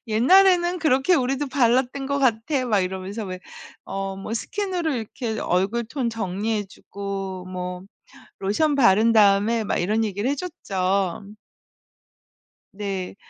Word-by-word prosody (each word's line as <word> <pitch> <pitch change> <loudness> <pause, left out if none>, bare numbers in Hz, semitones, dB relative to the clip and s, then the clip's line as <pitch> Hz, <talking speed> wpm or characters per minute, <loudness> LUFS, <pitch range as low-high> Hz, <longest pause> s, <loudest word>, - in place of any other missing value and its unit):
"옛날에는 350 - +4
그렇게 285 +3 +3
우리도 270 0 0
발랐던 255 +1 +1
것 280 +1 -1
같아." 255 +1 +1
막 210 -4 +2
이러면서 190 +4 -4
왜 185 -1 -6 0.5
어 195 0 -4
뭐 195 +3 -5
스킨으로 360 - -2
이렇게 225 0 -4
얼굴 195 +7 0
톤 240 +1 -2
정리해 210 0 -2
주고 195 -1 -6
뭐 180 0 -5 0.6
로션 280 +10 +1
바른 225 -2 +5
다음에 215 +1 +4
막 - - -1
이런 210 +6 +1
얘기를 210 +3 -1
해 - - +1
줬죠. 200 - -2 1.4
네. 195 -2 -4
220 Hz, 255 characters per minute, -23 LUFS, 195-265 Hz, 1.4 s, 바른